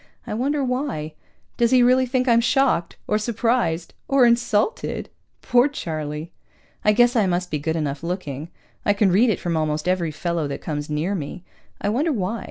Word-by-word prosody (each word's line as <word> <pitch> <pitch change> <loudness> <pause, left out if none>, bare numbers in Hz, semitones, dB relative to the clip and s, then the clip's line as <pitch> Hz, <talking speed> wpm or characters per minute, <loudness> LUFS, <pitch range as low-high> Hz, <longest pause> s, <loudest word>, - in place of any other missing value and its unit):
I 230 - -5
wonder 275 +6 0
why? 250 - -2 0.4
Does 235 -1 +3
he 255 0 +5
really 255 +1 +4
think 255 +1 0
I'm 235 -1 +5
shocked? 245 -7 +1
Or 210 - +1
surprised? 220 -7 0
Or 270 -2 +5
insulted? 235 - +1 0.3
Poor 245 +2 +4
Charlie! 155 - -5 0.5
I 210 - +5
guess 240 +3 +4
I 215 -4 +3
must 180 0 -1
be 150 - -1
good 160 +2 -2
enough 145 -3 -2
looking. 165 -4 -4 0.3
I 205 - +3
can 200 -2 +2
read 225 +7 +4
it 215 - 0
from 170 -2 -2
almost 155 0 -1
every 180 -3 +1
fellow 165 0 -2
that 140 - -5
comes 150 -2 -4
near 155 +6 -1
me. 180 0 -5 0.4
I 205 - -1
wonder 285 +10 +1
why? 220 -2 -2
200 Hz, 180 wpm, -23 LUFS, 160-245 Hz, 0.5 s, he